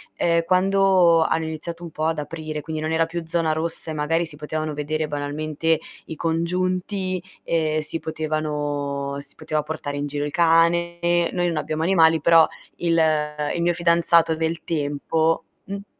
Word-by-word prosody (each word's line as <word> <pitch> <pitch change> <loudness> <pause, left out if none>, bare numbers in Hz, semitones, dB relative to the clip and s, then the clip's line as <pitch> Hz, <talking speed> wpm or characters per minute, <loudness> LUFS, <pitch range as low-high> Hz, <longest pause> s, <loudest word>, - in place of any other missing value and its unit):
ehm, 170 -1 +2
quando 185 -2 +4
hanno 160 0 0
iniziato 160 +2 -6
un 170 - -6
po' 155 +1 -3
ad 160 -1 0
aprire, 155 0 -5
quindi 155 +1 -5
non 155 +1 -2
era 165 0 +2
più 170 +1 -5
zona 165 -1 0
rossa 160 0 -3
e - - -3
magari 160 +3 0
si 155 -2 -10
potevano 155 +1 -3
vedere 155 +1 -2
banalmente 150 +2 -1 0.3
i 160 - -7
congiunti, 185 +3 -1 0.2
ehm, 155 -2 0
si 155 +2 -4
potevano 145 -3 -2
si 140 0 -12
poteva 155 -1 -2
portare 150 -2 -5
in 145 - -2
giro 145 0 -2
il 145 - -4
cane, 170 +1 +3 0.3
noi 175 -1 0
non 170 -2 -1
abbiamo 155 +1 -2
animali, 165 -3 +4
però 165 -1 +7 0.3
il 165 -1 +2 0.5
il 170 - -1
mio 175 +1 +2
fidanzato 170 -1 +3
del 160 +1 -2
tempo 160 +1 0 0.2
mh? 200 +1 -6
160 Hz, 165 wpm, -23 LUFS, 155-170 Hz, 0.5 s, però